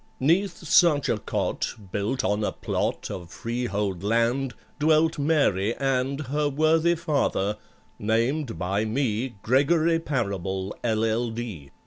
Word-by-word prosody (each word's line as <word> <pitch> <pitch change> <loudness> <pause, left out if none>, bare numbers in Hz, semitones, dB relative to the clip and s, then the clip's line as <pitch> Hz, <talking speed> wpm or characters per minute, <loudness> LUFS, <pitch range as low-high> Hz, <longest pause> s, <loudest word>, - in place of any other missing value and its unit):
'Neath 170 +4 +1
such 150 -5 +4
a 110 - +1
cot, - - -2 0.2
built 105 +8 -1
on 105 +2 0
a - - 0
plot - - -2
Of 85 -2 -7
freehold 105 -6 -3
land, 115 +5 +1 0.2
dwelt 155 +1 +3
MARY 140 - +2
and 135 +1 0
Her 145 +2 0
worthy 160 +4 +3
father, 140 - 0 0.4
named 115 +5 0
by 95 +3 0
me 115 +1 -1
GREGORY 160 +6 +3
PARABLE, 100 - -2
LL.D. 110 -7 -1
125 Hz, 115 wpm, -25 LUFS, 105-150 Hz, 0.4 s, such